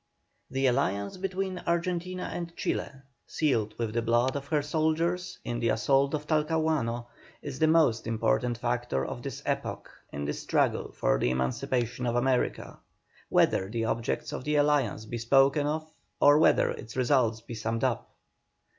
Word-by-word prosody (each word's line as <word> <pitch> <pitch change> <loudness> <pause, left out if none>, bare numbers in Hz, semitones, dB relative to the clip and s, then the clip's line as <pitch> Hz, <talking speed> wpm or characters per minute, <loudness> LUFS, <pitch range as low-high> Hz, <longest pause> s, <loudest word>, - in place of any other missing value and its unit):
The 135 +1 0
alliance 100 - 0
between 190 0 -3
Argentina 180 +1 -1
and 170 -1 -6
Chile, - - -1 0.4
sealed 115 -9 0
with 115 -2 -2
the 115 - +1
blood 120 +3 +2
of 140 0 -4
her 150 -1 +1
soldiers 165 +4 0
in 120 0 -2
the 115 -1 +1
assault 135 +6 +2
on 150 - -3
Talcahuano, 150 -6 0 0.4
is 140 -2 -6
the 155 - +4
most 150 -9 +3
important 115 - +1
factor 120 - -1
of - - -6
this - - -6
epoch - - -3 0.2
in 70 0 -4
the 75 - -1
struggle - - 0
for - - +1
the - - +1
emancipation 120 - -1
of 120 - 0
America, 125 +1 0 0.5
whether 95 - +3
the 115 +1 -2
objects 115 0 -2
of - - -5
the 150 +2 0
alliance 145 -7 +2
be 120 +2 -5
spoken 135 +5 +4
of 155 +1 -2 0.3
or 145 +1 +6
whether - - +4
its 115 +1 -8
results 125 -4 +2
be 115 - -9
summed 115 +1 -2
up. 130 -4 -1
130 Hz, 160 wpm, -28 LUFS, 115-155 Hz, 0.5 s, or